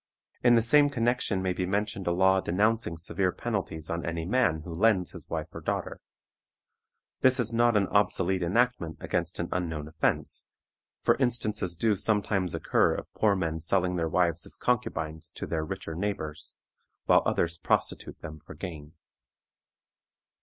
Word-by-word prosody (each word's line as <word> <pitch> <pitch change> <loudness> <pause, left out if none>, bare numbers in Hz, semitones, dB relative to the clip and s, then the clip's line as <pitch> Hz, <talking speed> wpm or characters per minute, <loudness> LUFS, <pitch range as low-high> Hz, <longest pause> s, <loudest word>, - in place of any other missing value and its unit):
In 120 -1 +6
the 115 - +4
same 145 +4 +5
connection 120 -6 0
may 95 -1 0
be 90 0 -2
mentioned 100 0 -2
a - - +3
law 95 +2 +4
denouncing 105 -1 +1
severe 90 +3 -1
penalties 95 -10 -4
on 85 0 -3
any 85 -1 -3
man 95 -7 +2
who 85 +1 -7
lends 95 0 +2
his - - -8
wife - - -4
or - - -7
daughter. - - -3 1.2
This 130 0 +4
is 115 -1 +1
not 120 -1 +4
an 100 - +3
obsolete 95 -2 +1
enactment 95 -2 +1
against 85 +1 -2
an 85 - -1
unknown 80 -4 -2
offense, 80 +1 -1 0.6
for - - +4
instances 110 -8 0
do 105 +4 +2
sometimes 100 -3 0
occur - - +2
of - - -8
poor 105 -2 +2
men 80 -3 -2
selling 90 +2 +1
their 80 -2 -1
wives 85 -1 +1
as - - -4
concubines 80 +1 -1
to - - -4
their 80 -2 -2
richer 95 -1 -5
neighbors, 80 -4 -4 0.5
while - - +5
others 85 0 0
prostitute - - -1
them 80 0 -7
for 80 - -12
gain. 80 -5 -8
95 Hz, 160 wpm, -28 LUFS, 85-110 Hz, 1.2 s, In